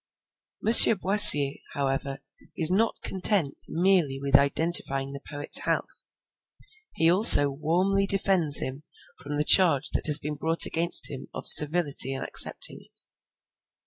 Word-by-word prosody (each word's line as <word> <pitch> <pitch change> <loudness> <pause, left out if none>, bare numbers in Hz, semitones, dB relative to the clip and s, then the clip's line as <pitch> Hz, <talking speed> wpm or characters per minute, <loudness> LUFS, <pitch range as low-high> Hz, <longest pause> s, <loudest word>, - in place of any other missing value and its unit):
M. 225 - -2 0.2
Boissier, 185 -8 +5 0.2
however, 135 0 -7 0.3
is 165 -2 0
not 220 +4 -4
content 185 -6 -2
merely 170 -6 -3
with 140 0 -5
identifying 140 -2 -3
the 140 0 -13
poet's 145 -1 -3
house; - - -2 0.9
he 165 - -1
also 175 -7 +6
warmly 180 +7 -5
defends 190 -6 0
him 130 +2 -6 0.4
from 145 +1 -11
the 150 - -4
charge 160 -7 0
that - - -4
has 150 -1 +5
been 150 0 -11
brought 165 +3 0
against 170 +1 -1
him - - -11
of - - -11
servility 145 -4 +3
in 135 - -9
accepting - - -3
it. - - -17
155 Hz, 135 wpm, -21 LUFS, 140-185 Hz, 0.9 s, also